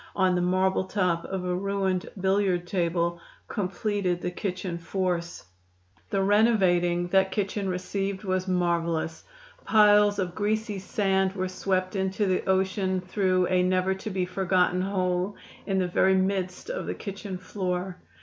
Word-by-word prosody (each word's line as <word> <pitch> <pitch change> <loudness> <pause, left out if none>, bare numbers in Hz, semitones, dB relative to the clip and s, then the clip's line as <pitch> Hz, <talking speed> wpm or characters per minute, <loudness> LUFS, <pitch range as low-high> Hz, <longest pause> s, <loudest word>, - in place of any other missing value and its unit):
on 185 -2 +3
the 180 - +1
marble 185 +1 +1
top 180 -4 0
of 190 -1 -4
a 180 - 0
ruined 190 -1 -1
billiard 190 -2 +1
table, 170 -1 -1 0.3
completed 195 -2 -1
the 180 - -3
kitchen 185 -1 -4
force. 175 -1 -2 0.7
The 195 - +1
renovating 185 -5 +3
that 190 +1 +3
kitchen 200 -1 -1
received 195 +2 -3
was 185 -1 -1
marvelous! 170 -3 0 0.4
Piles 210 -1 +5
of 185 -3 -2
greasy 215 0 -1
sand 190 0 0
were 185 -1 -2
swept 185 0 -1
into 190 +2 0
the 185 -1 +1
ocean 190 0 +1
through 185 0 +1
a 185 -1 +3
never 185 +1 +2
to 190 +3 -6
be 185 -2 -1
forgotten 180 -1 +1
hole 185 0 -1 0.3
in 195 -2 0
the 185 -1 +1
very 190 +2 +3
midst 190 - -1
of - - -4
the - - -2
kitchen 200 -2 -6
floor. 180 -1 -3
185 Hz, 145 wpm, -27 LUFS, 180-195 Hz, 0.7 s, Piles